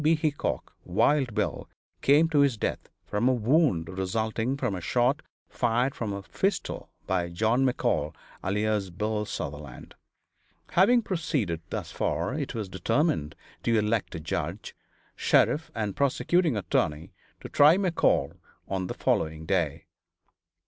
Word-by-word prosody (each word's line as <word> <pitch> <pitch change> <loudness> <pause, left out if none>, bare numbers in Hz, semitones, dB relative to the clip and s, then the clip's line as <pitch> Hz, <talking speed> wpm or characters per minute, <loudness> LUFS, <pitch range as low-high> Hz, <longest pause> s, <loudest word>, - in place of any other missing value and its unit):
B. 160 +2 +5
Hickok 155 -2 -2
(Wild 135 -7 +2
Bill) 95 - -2 0.3
came 150 +4 +5
to 150 -3 +2
his 140 -5 +3
death - - -3 0.2
from 110 +5 +1
a - - +4
wound 120 - +2
resulting 110 +7 -1
from 125 -6 -1
a 90 - -4
shot 125 - +1 0.3
fired 120 +2 +1
from 110 -3 -4
a 100 0 -5
pistol 195 - -2 0.2
by 90 -2 0
John 110 +9 +1
McCall, 80 - 0 0.3
alias 105 0 0
Bill 105 +4 -2
Sutherland. 75 -7 -7 0.8
Having 230 +7 +5
proceeded 150 - -1
thus - - -4
far, 85 +10 -1
it 140 -3 -3
was 110 -3 -3
determined 95 - 0 0.3
to 115 -1 +2
elect 105 0 0
a - - -4
judge, 80 - -4 0.4
sheriff 160 +2 +2
and 105 -3 -2
prosecuting 145 - +2
attorney 80 -4 -1 0.3
to - - -6
try 150 +5 +6
McCall 170 - +1 0.3
on 95 -1 -2
the - - -5
following 80 0 0
day. 85 -6 0
110 Hz, 135 wpm, -27 LUFS, 95-140 Hz, 0.8 s, try